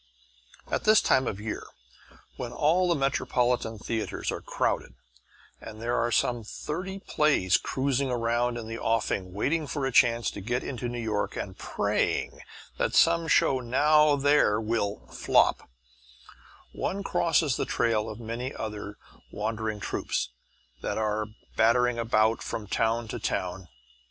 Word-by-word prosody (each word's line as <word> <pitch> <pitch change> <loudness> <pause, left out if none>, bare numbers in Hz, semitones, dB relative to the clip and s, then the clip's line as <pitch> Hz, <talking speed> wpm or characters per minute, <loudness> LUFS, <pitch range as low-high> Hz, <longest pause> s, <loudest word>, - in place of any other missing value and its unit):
At - - 0
this 215 0 +6
time 130 -1 +2
of 100 - -3
year, 110 +1 -4 0.7
when - - -5
all 175 +4 +2
the 170 - +3
metropolitan 125 -4 0
theatres 110 +1 -3
are - - -5
crowded 60 - -2 0.7
and 110 -1 -9
there 120 +2 -1
are 120 0 +1
some 120 +1 +1
thirty 180 - -5
plays 150 - +2
cruising 135 0 -1
round 120 0 0
in 115 -2 -6
the 115 0 -5
offing 100 -4 0
waiting 145 - -1
for 140 -2 -2
a 135 - -1
chance 120 -2 +3
to - - -8
get 120 +5 -2
into 125 -2 -4
New 120 - -5
York 110 -3 -2
and 95 -2 -5
praying - - -1 0.4
that - - 0
some 165 0 +4
show 135 -3 +3
now 150 +5 +4
there 145 -7 +3
will 110 -2 -2
"flop," - - +2 1.0
one 200 +1 -3
crosses 165 -7 +2
the - - -1
trail 110 -2 0
of 110 - -8
many 120 +3 -4
other 105 -1 -6 0.3
wandering 110 0 -3
troupes 100 - -2 0.5
that - - -2
are 110 -1 -1 0.3
battering 120 +1 +3
about 110 -1 +2
from 105 - -4
town 115 +3 0
to - - -4
town. 90 +1 -3
120 Hz, 145 wpm, -27 LUFS, 110-135 Hz, 1.0 s, this